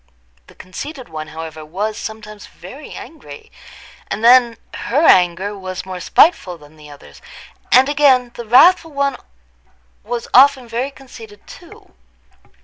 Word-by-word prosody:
The - - -19
conceited 260 - -9
one, 155 -1 -7
however, 160 0 -9
was 200 +8 -4
sometimes 215 -1 -9
very 250 - -13
angry, 240 - -12 0.6
and 215 - -5
then 240 -1 +5 0.2
her 290 +7 -1
anger 185 - +3
was 185 -2 -7
more 185 -1 -7
spiteful 185 - +2
than 150 0 -19
the 150 -1 -15
other's; 145 -1 -16 0.5
and, 260 +1 +5
again, 275 -4 +2
the 235 - -9
wrathful 320 +6 +4
one 280 -1 -1 0.9
was 235 +2 -5
often 265 -1 +5
very 240 +4 -3
conceited 230 -6 -15
too. - - -16
225 Hz, 135 wpm, -17 LUFS, 180-265 Hz, 0.9 s, then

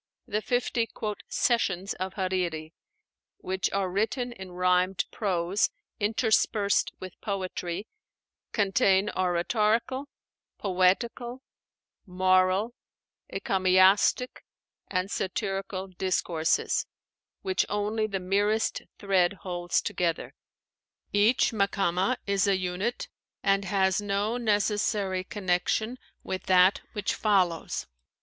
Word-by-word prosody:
The 210 +1 -2
fifty 245 -1 0 0.4
"sessions" 195 -6 0
of 185 +1 -5
Hariri, 180 -5 -2 0.6
which 190 0 -2
are 195 -1 0
written 225 +6 -1
in 190 -5 -9
rhymed 180 +1 +2
prose 190 -1 0 0.3
interspersed 215 -1 +2
with 185 -1 -10
poetry, 185 -2 -3 0.7
contain 195 0 +2
oratorical, 215 +9 +1 0.5
poetical, 230 +7 0 0.6
moral, 185 +4 +2 0.6
encomiastic, 190 +5 +3 0.4
and 185 +1 -2
satirical 195 0 -3
discourses, 180 -3 0 0.6
which 380 -1 +1
only 210 +1 0
the 195 -2 -3
merest 205 +4 +1 0.2
thread 190 -2 +2
holds 175 -2 -1
together. 170 -2 -2 0.8
Each 210 +5 +4
Makámah 200 +1 +1
is 200 0 +1
a 195 -1 +3
unit, 185 +6 -2 0.4
and 195 0 +2
has 190 0 +2
no 205 +3 -1
necessary 205 -3 0
connection 205 +5 -1 0.2
with 185 -1 -4
that 185 +1 +5
which 205 -1 -1
follows. 185 -6 +1
195 Hz, 90 wpm, -28 LUFS, 185-210 Hz, 0.8 s, that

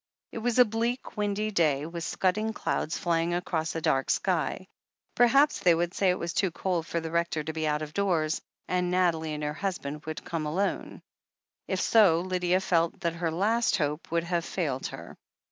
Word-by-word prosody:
It - - -5
was 240 +1 0
a 250 - +8
bleak, 230 +4 -2
windy 210 0 -1
day, 150 -7 +2
with 170 +1 -6
scudding 215 +6 0
clouds 160 - -2
fly 170 -2 +1
ing 170 +1 0
across 165 -3 -2
a 165 - -2
dark 135 -3 +1
sky. - - 0 0.5
Perhaps 275 +5 +4
they 175 -2 +4
would 175 +2 -1
say 195 - +2
it 180 - +2
was 170 0 -4
too 195 - +2
cold 175 -1 -2
for 170 - -1
the 160 -1 -5
Rector 170 -2 0
to 160 +1 -4
be 160 -1 -1
out 150 0 0
of 150 0 -8
doors, 170 -6 0 0.3
and 180 -1 0
Nathalie 165 -4 +1
and 150 - -5
her 150 0 -1
husband 155 -5 -4
would 155 - -5
come 160 -3 -3
alone. 190 +7 -2 0.6
If - - -1
so, 190 -7 +5
Lydia 180 0 +1
felt 170 -1 +1
that 170 -2 0
her 170 0 -2
last 215 +8 +1
hope 150 0 -2
would 170 0 +1
have 170 0 -1
failed 145 -8 -2
her. - - -9
170 Hz, 195 wpm, -28 LUFS, 160-195 Hz, 0.6 s, a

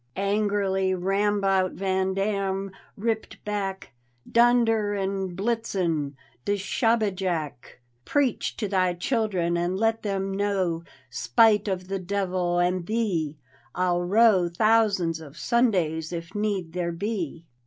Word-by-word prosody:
Angrily 200 -1 +1
Rambout 195 0 +1
van 190 0 0
Dam 195 -1 -1 0.3
ripped 220 +1 -3
back: 195 -5 -3 0.3
"Dunder 230 -3 +3
en 195 -2 -2
Blitzen! 185 -9 -1 0.3
du 205 - 0
SchobbejakI 195 - 0 0.5
Preach 285 - 0
to 215 - -2
thy 185 -2 +1
children! 185 -4 0
and 175 +2 -1
let 225 +2 +1
them 195 -2 -2
know 195 -4 0 0.3
Spite 210 - +3
of 185 -2 -2
the 195 0 -2
duyvil 185 -2 -1
and 175 0 +1
thee, 180 -10 -1 0.4
I'll 180 -1 +1
row 190 -1 +4
Thousands 200 -4 +2
of 155 -1 -12
Sundays, 180 -11 +1
if 170 +1 -6
need 200 -6 -2
there 175 -1 -1
be. 170 -3 -4
195 Hz, 115 wpm, -26 LUFS, 175-210 Hz, 0.5 s, row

